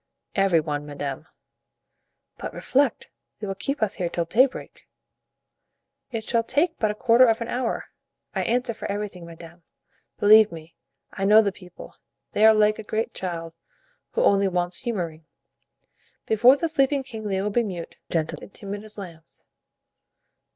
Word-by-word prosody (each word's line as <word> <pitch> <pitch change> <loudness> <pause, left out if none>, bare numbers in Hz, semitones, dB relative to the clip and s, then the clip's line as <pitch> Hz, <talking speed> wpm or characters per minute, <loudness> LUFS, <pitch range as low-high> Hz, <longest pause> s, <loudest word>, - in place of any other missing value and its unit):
"Every 195 -4 +3
one, 145 -1 -4
madame." 145 +1 -5 1.1
"But - - -6
reflect, 275 -2 0 0.3
they 215 - -5
will 195 - -3
keep 220 +7 -2
us 215 -1 0
here 175 -3 -2
till 170 0 -2
daybreak." 250 +10 0 1.2
"It 225 -4 -4
shall 230 +1 +1
take 295 +9 0
but 215 - +2
a 210 - -2
quarter 245 +2 +5
of 225 -1 +2
an 230 - -5
hour, 245 -2 -3 0.4
I - - -1
answer 245 +1 0
for 215 - -5
everything, 200 -4 -5
madame; 170 +1 -12 0.6
believe 215 +1 +7
me, 165 0 -11 0.4
I 195 - -4
know 215 +2 +7
the 200 - 0
people; 180 -1 -13 0.3
they 215 +1 +5
are 220 - +8
like 215 0 +3
a - - -5
great 220 +2 -2
child, 165 -3 -4 0.6
who - - +1
only 200 0 +4
wants 180 -1 -1
humoring. 170 -10 -4 1.0
Before 240 +5 +5
the 330 - -1
sleeping 275 -2 +1
king 225 -4 -8
they 195 -2 -1
will 205 +2 -1
be 240 - +2
mute, 185 -7 -6
gentle 160 -2 -2
and - - -11
timid 205 +1 -6
as 215 0 -6
lambs." 170 -5 -11
205 Hz, 160 wpm, -24 LUFS, 175-230 Hz, 1.2 s, are